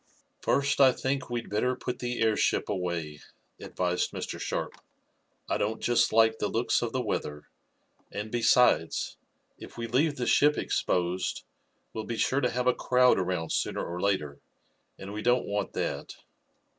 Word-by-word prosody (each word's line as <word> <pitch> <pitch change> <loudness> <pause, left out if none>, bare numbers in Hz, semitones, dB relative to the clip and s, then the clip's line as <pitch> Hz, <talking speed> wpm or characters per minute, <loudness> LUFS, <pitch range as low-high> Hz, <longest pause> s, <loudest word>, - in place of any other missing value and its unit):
"First 140 0 +1
I 130 -2 +7
think 135 0 -2
we'd 120 -1 -3
better 125 +5 0
put 125 0 -5
the 125 -1 -3
airship 110 -1 +1
away," 85 -6 -3 0.4
advised 90 -1 -1
Mr. - - -6
Sharp. - - -3 0.7
"I - - -1
don't 110 +2 -1
just 120 -1 +2
like 110 0 +4
the 105 - 0
looks 115 +3 +1
of 120 -1 -2
the 130 -1 -1
weather, 75 -7 -4 0.6
and, 105 +1 -5
besides, 120 -8 +3 0.4
if - - -11
we 115 - -3
leave 140 +6 +1
the 125 - -3
ship 150 +4 +4
exposed 90 +1 -1 0.5
we'll 110 -1 -4
be 115 - -4
sure 135 +5 +1
to 125 - +2
have 125 +1 -2
a 125 - +4
crowd 125 -3 +3
around 90 -3 -2
sooner - - -1
or 90 +1 -5
later, 75 -8 -1 0.6
and 100 +1 -8
we 105 - -4
don't 125 +2 +2
want 100 -1 -2
that." - - -3
110 Hz, 160 wpm, -28 LUFS, 95-125 Hz, 0.7 s, I